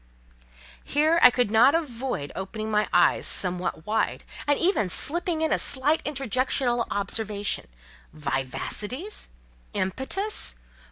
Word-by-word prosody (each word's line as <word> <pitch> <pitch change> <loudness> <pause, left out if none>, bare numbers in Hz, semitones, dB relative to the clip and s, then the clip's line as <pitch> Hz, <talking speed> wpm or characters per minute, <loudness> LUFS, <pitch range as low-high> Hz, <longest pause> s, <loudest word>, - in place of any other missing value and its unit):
Here 310 +4 +2
I 250 - +10
could 245 -4 0
not 240 +7 +6
avoid 250 - -3
opening 215 +3 -5
my 210 0 +2
eyes - - +4
somewhat 180 -3 +1
wide, 220 +1 -1 0.2
and 290 -1 +3
even 340 - +1
slipping 335 - +1
in 315 - +2
a - - +1
slight 285 +4 +1
interjectional 255 -3 0
observation: 205 0 -2 0.4
"Vivacities? 155 - -4 0.5
Impetus? 265 - -1
245 Hz, 110 wpm, -26 LUFS, 205-295 Hz, 0.5 s, I